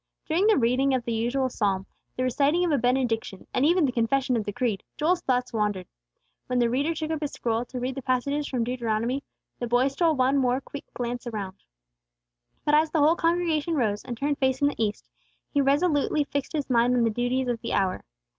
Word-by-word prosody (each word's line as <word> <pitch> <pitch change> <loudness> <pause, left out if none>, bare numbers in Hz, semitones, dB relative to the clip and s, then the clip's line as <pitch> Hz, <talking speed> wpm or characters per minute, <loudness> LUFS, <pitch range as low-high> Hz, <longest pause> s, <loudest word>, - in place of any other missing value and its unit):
During 345 +6 +2
the 440 - +5
reading 260 +3 +2
of 245 -2 -2
the 235 - -1
usual 245 +4 0
psalm, 195 -6 -1 0.3
the 255 - 0
reciting 285 +7 +2
of 340 - 0
a 285 - +2
benediction, 240 -6 0
and 255 - +1
even 335 +2 +4
the 265 - 0
confession 250 +2 +1
of 220 -3 -1
the 205 - -2
creed, 210 -2 -1 0.2
Joel's 345 +3 +1
thoughts 250 -1 0
wandered. 205 -4 -1 0.6
When 250 - -1
the 240 -1 +2
reader 285 +6 0
took 315 0 -3
up 315 -1 -2
his 295 - -3
scroll 230 0 -1
to 250 +1 -6
read 255 +2 -2
the 270 - -6
passages 280 +3 -1
from 250 -3 -1
Deuteronomy, 240 +2 -1 0.4
the 240 - -2
boy 245 +3 +3
stole 320 +3 +1
one 265 +1 +2
more 255 0 +2
quick 285 +1 -10
glance 245 0 -4
all 235 - -5
around. 195 -2 -5 1.1
But 295 - +2
as 310 +1 +4
the 320 - -1
whole 310 +2 +5
congregation 335 -2 +1
arose, 215 -6 0
and 245 -2 -6
turned 285 +3 -1
facing 265 +2 +2
the 230 - -2
east, 210 -1 -3 0.5
he 285 - +3
resolutely 290 +1 +2
fixed 285 +1 -4
his 295 -3 -2
mind 245 0 +3
on 240 - +3
the 225 - +2
duties 245 +3 -1
of 240 -2 -2
the - - -3
hour. 190 -2 0
255 Hz, 215 wpm, -26 LUFS, 235-290 Hz, 1.1 s, the